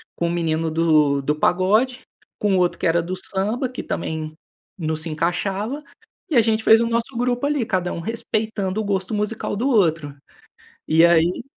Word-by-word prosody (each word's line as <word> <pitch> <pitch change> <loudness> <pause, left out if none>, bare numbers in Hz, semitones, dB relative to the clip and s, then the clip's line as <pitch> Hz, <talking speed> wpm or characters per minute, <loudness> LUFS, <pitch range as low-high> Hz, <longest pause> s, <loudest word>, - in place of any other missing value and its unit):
com 170 - -1
o - - -1
menino 165 -1 -1
do 155 -4 +3
do 150 +2 0
pagode, 215 +10 +2 0.4
com 205 -2 +1
o - - +2
outro 175 -1 +1
que 185 - 0
era 170 +1 +2
do 180 +3 -4
samba, 205 +7 -2
que 255 - -7
também 155 -1 -4 0.4
não 160 -3 -2
se 160 +1 -3
encaixava, 195 - -2 0.5
e 305 - -1
a - - +7
gente 220 0 0
fez 225 +1 +6
o 235 - +1
nosso 235 +2 -2
grupo 245 +2 0
ali. 290 -5 0
Cada 180 -4 -1
um - - -5
respeitando 215 -1 -2
o - - -3
gosto 195 0 -2
musical 210 0 -2
do 245 +7 0
outro. 165 - +1 0.7
E 160 +2 +5
aí 170 +4 +3
190 Hz, 185 wpm, -22 LUFS, 165-225 Hz, 0.7 s, a